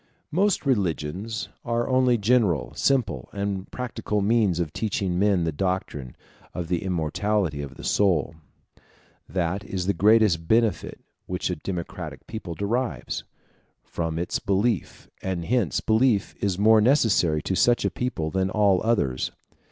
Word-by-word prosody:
Most 190 0 +1
religions 100 - -1
are 120 0 -1
only 130 -2 +3
general, 100 - +2
simple, 120 - 0
and 100 -1 -3
practical 115 -4 -3
means 100 -4 +2
of 80 -4 -2
teaching 95 -5 -1
men 100 -3 +3
the 80 - 0
doctrine 75 -6 -3 0.4
of 85 -2 -4
the 90 -2 0
immortality 90 -1 -1
of 70 -1 -7
the - - -11
soul. 90 -8 +2 1.0
That 95 +2 -1
is 95 -3 -4
the 100 - +2
greatest 100 -3 +4
benefit 110 -4 +1 0.3
which - - -2
a - - -1
democratic 85 +1 -6
people 110 -7 -6
derives, 120 +6 -2 0.6
from 80 -1 -3
its 85 +1 -1
belief, 100 0 -1
and 95 -3 -3
hence 110 - +1
belief 110 -2 +2
is 95 -3 +1
more 110 +2 +5
necessary 105 - +3
to - - -1
such 120 +5 +3
a - - +1
people 80 -11 -3
than 95 0 +1
to 95 - -6
all 100 -4 +3
others. 75 - 0
100 Hz, 145 wpm, -25 LUFS, 85-115 Hz, 1.0 s, more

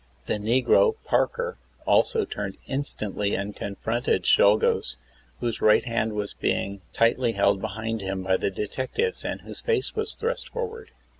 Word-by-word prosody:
The 105 - -1
negro, 125 - +4
Parker, 480 0 0 0.3
also 450 -2 +3
turned - - -5
instantly 105 -7 -2
and 100 +1 -3
confronted 110 +4 -1
Czolgosz, 100 - +4 0.5
whose 120 -2 -1
right 105 0 +5
hand 115 -2 0
was 105 -1 -3
being 100 0 -1
tightly 115 +1 +2
held 100 -2 +2
behind 110 +2 -3
him, 95 -1 -3
by 95 0 +2
the - - 0
detectives 130 - -2
and - - -3
whose - - -9
face 450 -4 0
was 440 0 -1
thrust 475 +2 -2
forward. 460 -2 -5
115 Hz, 145 wpm, -26 LUFS, -, 0.5 s, right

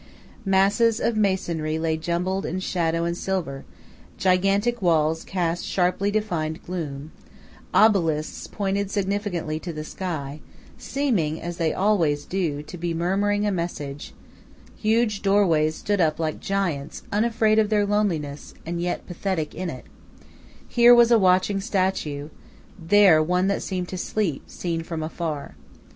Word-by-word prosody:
Masses 200 +4 +3
of 230 - 0
masonry 175 -7 0
lay 160 0 0
jumbled 175 +4 -2
in 185 - -3
shadow 165 -3 0
and 170 - 0
in - - -1
silver; 170 -7 -3 0.5
gigantic 195 +5 +2
walls 160 -2 +2
cast 175 -2 -2
sharply 185 +2 0
defined 170 -7 -2
gloom; 155 -4 -5 0.6
obelisks 165 -8 +2
pointed 200 -1 -2
significantly 195 -6 -2
to 175 - -6
the 155 -1 -6
sky, 155 -4 -5 0.4
seeming, 205 - -1
as 175 0 -6
they 165 -2 +1
always 170 -8 +1
do, 165 -6 -2
to 175 +3 -10
be 170 -1 -2
murmuring 200 +4 +1
a 205 - +1
message; 150 -6 -5 0.6
huge 215 -1 +1
doorways 170 -6 +3
stood 205 +1 -1
up 155 -2 +2
like 160 -1 -2
giants 175 -8 -2
unafraid 220 0 +2
of 215 -1 +2
their 210 -2 +2
loneliness 170 -9 -1
and 170 +1 -3
yet 175 0 -2
pathetic 175 -3 -3
in 185 +1 -4
it; 130 - -8 0.8
here 240 0 +7
was 240 0 +6
a 230 - +6
watching 190 +1 +3
statue, 185 -8 -1 0.5
there 180 -1 +5
one 180 +3 +1
that 200 0 0
seemed 180 -2 -3
to 185 - -5
sleep, 185 -7 -1
seen 165 -2 -3
from 165 -1 -5
afar. 155 - -4
180 Hz, 140 wpm, -24 LUFS, 160-200 Hz, 0.8 s, here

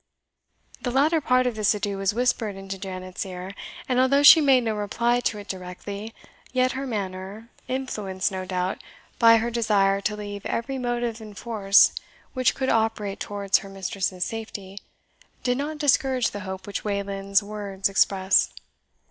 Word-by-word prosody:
The 250 - -2
latter 300 +6 +2
part 255 -2 +3
of 250 - 0
this 215 0 +2
adieu 200 -1 -3
was 195 -1 +1
whispered 230 -2 0
into 195 0 -7
Janet's 185 -1 -5
ear 185 0 -7 0.3
and 255 -1 +1
although 275 +2 +4
she 315 +2 +10
made 265 -4 +4
no 225 -1 0
reply 235 +4 0
to 230 -3 -1
it 205 0 -9
directly, 200 +3 -7 0.4
yet 255 0 +2
her 270 +1 -4
manner, 200 +1 -5 0.2
influenced, 210 -8 -2
no 190 -1 -4
doubt, 185 0 -2 0.4
by 230 -1 +7
her 230 +1 -1
desire 200 -4 +2
to 210 +1 -1
leave 205 -1 -7
every 265 +3 -3
motive 240 -2 -2
in 210 -2 -10
force 200 -2 +4 0.4
which 255 -2 +2
could 265 -1 -1
operate 220 -3 0
towards 200 -1 0
her 195 - -10
mistress's 190 -1 -2
safety, 205 -3 -7 0.6
did 250 +1 0
not 300 +2 -3
discourage 265 -3 +2
the 205 - -6
hope 190 0 -6
which 205 - -5
Wayland's 200 0 0
words 200 -2 -3
expressed. 195 -1 +2
210 Hz, 160 wpm, -25 LUFS, 195-245 Hz, 0.6 s, she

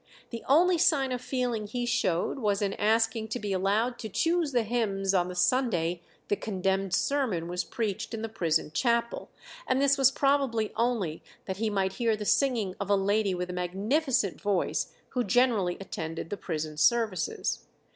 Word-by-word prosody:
The 230 -2 -5
only 345 +5 +4
sign 275 -6 +3
of 250 -1 -2
feeling 245 -5 -2
he 245 +3 -3
showed 185 - 0
was 205 -3 0
in 200 -1 0
asking 225 +1 +1
to 225 +3 -4
be 205 -3 -3
allowed 210 +6 0
to 220 - -5
choose 330 - +1
the 245 -3 +2
hymns 200 -4 0
on 180 -2 +2
the 180 - -6
Sunday 180 -7 +1 0.3
the - - +1
condemned 195 -2 -1
sermon 230 -14 0
was 180 +1 -2
preached 215 -5 -3
in 225 - -6
the - - -1
prison 165 -8 0
chapel, 235 +4 0 0.4
and 255 - +2
this 280 0 +3
was 270 -1 +6
probably 270 -6 +1
only 225 -9 -1 0.2
that 190 -1 -4
he 220 +1 0
might 195 -2 0
hear 230 -2 +3
the 210 0 -6
singing 230 -7 +1
of 200 - -4
a 200 - +5
lady 200 0 +1
with 180 0 -3
a - - -6
magnificent 205 - 0
voice 200 -4 0 0.2
who 250 -2 -1
generally 205 -5 +2
attended 165 -4 -6
the - - -1
prison 155 -4 -4
services. 210 -2 +1
215 Hz, 175 wpm, -28 LUFS, 190-245 Hz, 0.4 s, was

